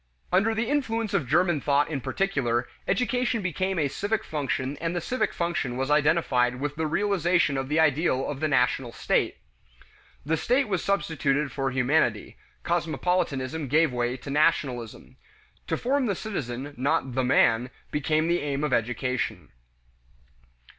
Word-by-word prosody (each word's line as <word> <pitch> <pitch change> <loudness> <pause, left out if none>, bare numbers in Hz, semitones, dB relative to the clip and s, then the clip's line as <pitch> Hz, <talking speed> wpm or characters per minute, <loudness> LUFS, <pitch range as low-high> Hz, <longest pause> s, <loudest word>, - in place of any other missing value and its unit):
Under 210 +5 +3
the 225 +1 -1
influence 230 -6 -1
of 150 -10 0
German 170 0 +2
thought 145 +1 +2
in 145 -4 -3
particular, 120 - 0 0.2
education 245 -3 0
became 185 +2 -1
a 150 -3 +2
civic 205 +10 -2
function 140 -2 -2
and 165 +1 -3
the - - +1
civic 255 +8 -1
function 170 -8 -2
was 135 +2 -1
identified 150 -5 +3
with 145 +1 -3
the 160 0 -1
realization 175 -3 +1
of 135 0 -3
the 155 +2 +2
ideal 150 -3 +2
of 145 -2 -4
the 155 - +1
national 125 -3 +1
state. - - 0 0.9
The 160 +2 +1
"state" 255 - +1
was 190 -5 -1
substituted 150 -7 0
for 135 +1 -1
humanity; 125 -4 +1 0.3
cosmopolitanism 160 -4 -1
gave 155 +1 +3
way 120 +1 -1
to 135 +2 -8
nationalism. 135 -6 0 0.5
To - - 0
form 265 +1 0
the 200 - 0
citizen, 145 - -5
not 135 0 0
the 130 +1 0
"man," 125 -1 +3 0.2
became 155 +2 +1
the 175 +1 +2
aim 145 0 -2
of 150 -4 0
education. 115 -3 -1
150 Hz, 150 wpm, -26 LUFS, 130-175 Hz, 0.9 s, Under